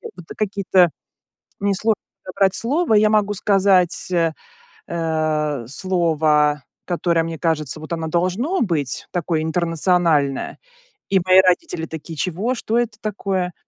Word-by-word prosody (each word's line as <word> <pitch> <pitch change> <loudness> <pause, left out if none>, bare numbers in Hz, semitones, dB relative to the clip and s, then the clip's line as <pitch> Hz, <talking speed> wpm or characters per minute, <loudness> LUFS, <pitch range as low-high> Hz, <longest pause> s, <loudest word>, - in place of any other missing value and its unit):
Вот 180 - -12
какие-то, 195 -3 +2 0.7
мне 200 0 +1
сложно 215 +2 0 0.2
подобрать 190 0 +1
слово, 275 - 0
я 215 0 +5
могу 210 -1 +2
сказать, 195 -2 +2
э, 165 -2 +1 0.6
э, 155 -5 -1
слово, 155 -3 +1 0.2
которое, 170 -2 0
мне 165 -1 -5
кажется, 155 -3 -1
вот 155 +1 -10
оно 165 -1 -3
должно 185 - 0
быть, 155 - -1
такое 170 -2 -1
интернациональное. 165 -3 +1 0.5
И 195 - +3
мои 185 0 +7
родители 180 - 0
такие: 160 +1 -8
"Чего? 190 - -1
Что 230 -1 -2
это 235 -3 -2
такое?" 190 -4 -2
175 Hz, 125 wpm, -20 LUFS, 160-200 Hz, 0.7 s, мои